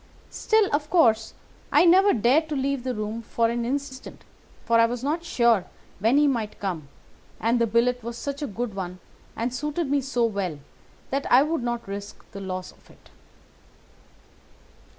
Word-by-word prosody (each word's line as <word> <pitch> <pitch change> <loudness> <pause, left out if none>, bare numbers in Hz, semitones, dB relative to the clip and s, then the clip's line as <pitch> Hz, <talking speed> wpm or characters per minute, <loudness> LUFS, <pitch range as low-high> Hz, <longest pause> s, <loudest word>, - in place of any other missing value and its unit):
Still, 440 -2 +2
of 295 +1 0
course, 225 -10 +3 0.4
I - - +5
never 380 +4 +6
dared 265 +8 +2
to 300 - -2
leave 275 -1 -1
the 255 -1 -2
room 215 +2 -4
for 230 +1 0
an 235 0 -2
instant, 265 +1 -5 0.4
for 230 0 +3
I 230 - +6
was 245 +1 -5
not 315 +4 -1
sure 235 - +2 0.3
when 225 +7 +3
he 295 - +5
might 230 -6 -2
come, 175 -7 -4 0.5
and 235 +2 +1
the 230 - +3
billet 240 +3 +1
was 235 +1 -6
such 280 +2 -5
a 290 - -2
good 225 +1 -4
one, 185 -2 -5 0.4
and 235 +2 -2
suited 300 +3 -2
me 285 -1 +2
so 245 -3 0
well, 200 -8 -2 0.5
that 275 +1 -2
I 255 +3 +7
would 320 -1 -1
not 240 -2 -3
risk 200 +1 -7
the 200 - -8
loss 185 -1 -5
of - - -25
it. - - -21
240 Hz, 175 wpm, -25 LUFS, 220-280 Hz, 0.5 s, I